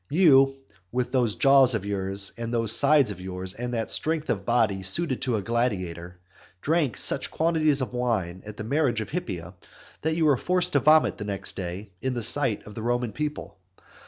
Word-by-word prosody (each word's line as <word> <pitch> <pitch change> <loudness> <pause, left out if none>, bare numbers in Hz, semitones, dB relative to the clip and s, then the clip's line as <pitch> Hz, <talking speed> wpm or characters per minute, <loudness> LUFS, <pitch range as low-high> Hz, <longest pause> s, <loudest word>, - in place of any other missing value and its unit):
You, 135 -5 +4 0.4
with 125 0 -2
those 120 -5 +1
jaws 135 -3 +4
of 100 -3 -4
yours, 100 -1 -2
and 115 -1 -5
those 115 -3 +1
sides 140 -2 +4
of 90 -2 -9
yours, 95 0 -5
and 125 +1 -5
that 115 -1 -2
strength 160 -1 0
of 100 -3 -3
body 110 -5 +1
suited 130 - +1
to 125 -3 0
a 105 - -3
gladiator, 90 -7 -3 0.4
drank 150 - 0
such - - +2
quantities 155 -3 +1
of 130 - -4
wine 110 -8 -2
at 105 0 -10
the - - -5
marriage 130 -1 0
of 110 - -7
Hippia, 95 - -5 0.5
that 160 +1 -1
you 165 -1 +1
were 145 -4 +4
forced 180 +4 -1
to 140 - +4
vomit 155 +4 +3
the 105 - -5
next 100 -1 -4
day 95 +2 -6
in 130 -1 -2
the 120 - -3
sight 135 -3 +3
of 105 - -11
the 110 - -7
Roman 120 0 -1
people. 150 -4 -6
120 Hz, 195 wpm, -25 LUFS, 100-140 Hz, 0.5 s, You